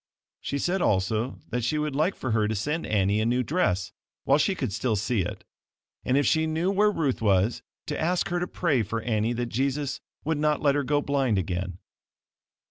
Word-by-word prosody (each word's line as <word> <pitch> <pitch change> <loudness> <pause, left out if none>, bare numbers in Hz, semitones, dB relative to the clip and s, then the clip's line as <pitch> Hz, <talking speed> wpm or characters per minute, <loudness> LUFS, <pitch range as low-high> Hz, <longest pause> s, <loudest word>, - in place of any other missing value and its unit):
She 140 - -3
said 175 +6 0
also 110 - +1
that 125 -1 -1
she 135 +7 0
would 150 -2 -1
like 160 +7 +1
for 130 - -3
her 110 -1 +2
to 110 - -1
send 150 - -2
Annie 100 0 +2
a - - 0
new 125 +2 +2
dress 105 - 0 0.3
while 140 +2 +4
she 190 +4 +2
could 130 - -3
still 110 +2 0
see 110 +1 0
it, 90 - -5 0.6
and 130 +2 +2
if 145 - +3
she 160 0 +2
knew 165 +4 0
where 205 +2 +4
Ruth 150 - -1
was 100 +1 +2 0.2
to 150 - -3
ask 180 +4 +1
her 175 0 0
to 180 - -2
pray 150 -9 +1
for 110 +2 -3
Annie 110 0 0
that 120 0 -2
Jesus 140 +3 -1 0.2
would 160 -1 0
not 150 0 +2
let 145 -2 +3
her 145 0 +1
go 145 +2 +1
blind 135 -6 +1
again. 90 0 -2
130 Hz, 210 wpm, -26 LUFS, 110-150 Hz, 0.6 s, while